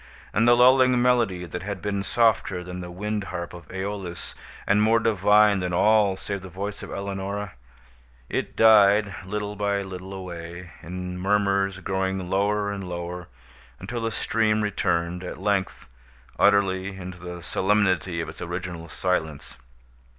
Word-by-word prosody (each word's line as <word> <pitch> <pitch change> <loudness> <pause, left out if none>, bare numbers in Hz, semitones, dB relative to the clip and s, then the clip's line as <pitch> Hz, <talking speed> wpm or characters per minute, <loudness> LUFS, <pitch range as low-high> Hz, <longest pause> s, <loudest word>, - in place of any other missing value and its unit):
And 115 +3 +3
the 120 - +7
lulling 125 0 +5
melody 120 -8 +2
that 90 0 -6
had 100 0 -5
been 100 +2 -2
softer 110 -4 +1
than 90 0 -7
the 90 -1 -7
wind 105 +3 -3
harp 85 -2 -5
of 85 -1 -11
Æolus, 95 -2 -5 0.3
and 105 +2 +3
more 110 +2 +4
divine 105 -1 +4
than 90 -1 -2
all 105 -1 +4
save 100 -1 -5
the 95 - -9
voice 100 +3 -5
of - - -8
Eleonora, 100 0 -4 0.8
it - - -3
died 105 -2 +6
little 105 +2 -4
by 100 -1 0
little 95 0 -8
away, 85 -2 -8
in 90 +2 -6
murmurs 100 0 +1
growing 95 -1 -2
lower 100 +1 +1
and 95 -2 -5
lower, 85 0 -5 0.5
until 115 +5 -5
the 115 - 0
stream 110 -1 +1
returned, 90 -3 -1
at 90 - -6
length, 100 +1 -1 0.5
utterly, 95 -1 +2
into 90 -1 -8
the 90 -1 -8
solemnity 95 -1 +1
of - - -5
its - - -11
original 85 -1 -5
silence. 80 -8 -2
95 Hz, 150 wpm, -25 LUFS, 90-105 Hz, 0.8 s, the